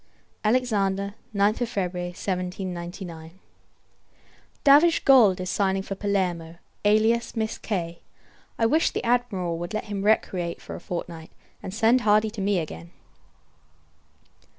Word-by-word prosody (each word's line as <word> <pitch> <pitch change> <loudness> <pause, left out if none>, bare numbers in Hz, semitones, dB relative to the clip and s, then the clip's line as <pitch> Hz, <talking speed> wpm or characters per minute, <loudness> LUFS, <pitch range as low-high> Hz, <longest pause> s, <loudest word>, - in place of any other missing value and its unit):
Alexander, 200 -4 +1 0.2
9th 210 +4 +2
February 180 -5 -3
1799. 180 -2 -5 1.2
Davidge 300 +4 +5
Gould 225 -9 +6
is 185 -1 -3
sighing 190 0 0
for 195 - -5
Palermo; 185 -5 -2 0.3
alias 220 +4 +2
Miss 220 -1 -2
K. 170 -5 -4 0.6
I 225 - +2
wish 315 +8 +3
the - - -4
Admiral 210 -9 0
would 175 +5 -5
let 215 - -2
him 205 -2 -4
recreate 185 -5 0
for - - -9
a - - -6
fortnight, 170 -2 -6 0.3
and - - -6
send 225 +4 +3
Hardy 215 -1 +3
to 215 -2 -6
me 200 0 +1
again. 170 +1 -5
195 Hz, 125 wpm, -25 LUFS, 180-220 Hz, 1.2 s, Gould